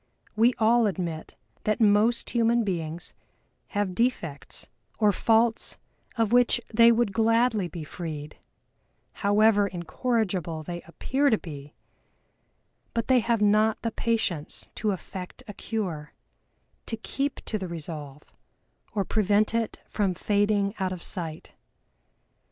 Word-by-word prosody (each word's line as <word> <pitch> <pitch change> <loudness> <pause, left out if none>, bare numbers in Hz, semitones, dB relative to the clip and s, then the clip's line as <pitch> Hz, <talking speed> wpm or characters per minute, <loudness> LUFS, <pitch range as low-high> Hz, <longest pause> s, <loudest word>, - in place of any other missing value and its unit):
We 230 +3 +4
all 230 +1 +4
admit 175 -5 -4 0.3
that 215 -1 0
most 220 +2 +3
human 235 0 +3
beings 170 -4 -4 0.5
have 205 -2 -1
defects 180 - -2 0.3
or 210 -2 +4
faults 225 +3 +2 0.4
of 225 -2 +1
which 245 -1 +4
they 230 +1 +7
would 230 -3 +1
gladly 225 -2 +2
be 170 -1 -7
freed 155 -2 -7 0.8
(however 205 0 +4
incorrigible 180 -2 -2
they 175 +2 -6
appear 265 - +1
to 220 - +3
be), 145 -5 -10 1.2
but 230 +2 -1
they 255 -1 +6
have 230 -2 +1
not 215 +1 +3
the 230 - -1
patience 220 -10 -2
to 215 - -1
effect 185 -1 -6
a 205 - -7
cure, 180 -10 -4 0.7
to 225 - -3
keep 275 +5 -2
to 215 - -2
the 190 - -4
resolve, 150 -4 -7 0.7
or 200 -2 0
prevent 210 0 +2
it 230 -1 -1
from 195 -4 0
fading 205 +1 +1
out 190 -1 0
of 180 -2 -6
sight. 165 -4 -6
205 Hz, 125 wpm, -27 LUFS, 175-230 Hz, 1.2 s, they